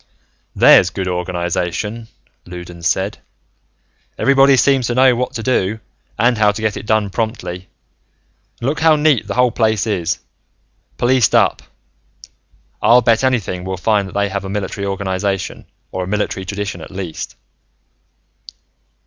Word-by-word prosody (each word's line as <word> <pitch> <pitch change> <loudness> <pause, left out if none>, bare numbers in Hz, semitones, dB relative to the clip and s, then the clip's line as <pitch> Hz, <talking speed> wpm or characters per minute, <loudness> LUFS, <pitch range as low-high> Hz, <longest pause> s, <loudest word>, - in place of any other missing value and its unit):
"There's - - +6
good 95 - -4
organization," 90 +5 -3 0.4
Loudons 90 -1 -6
said. 95 +4 -1 1.0
"Everybody 135 0 +4
seems 135 -2 +3
to 120 - -2
know 130 -1 +5
what 125 +1 -2
to 115 - -5
do, 110 -4 0 0.4
and 120 +1 +2
how 105 -1 +4
to 105 +2 -7
get 110 -2 0
it 105 - -8
done 110 -2 +1
promptly. 95 -5 -4 0.9
And 120 - -3
look 145 - -1
how 160 -1 +5
neat 150 -8 +2
the 100 - -4
whole 125 0 +3
place 110 -3 +1
is. 90 -6 -1 0.8
Policed 125 -2 +2
up. - - +3 1.2
I'll 120 +3 +6
bet 115 +2 +3
anything 110 -9 0
we'll 95 0 -4
find 100 0 +1
that - - -11
they 100 0 0
have 100 0 -4
a 95 - -6
military 100 0 -3
organization, 95 0 -3 0.2
or 95 - -3
a - - -6
military 100 -1 -2
tradition 100 +1 -4
at - - -10
least. 95 -4 -6
105 Hz, 145 wpm, -18 LUFS, 95-120 Hz, 1.2 s, There's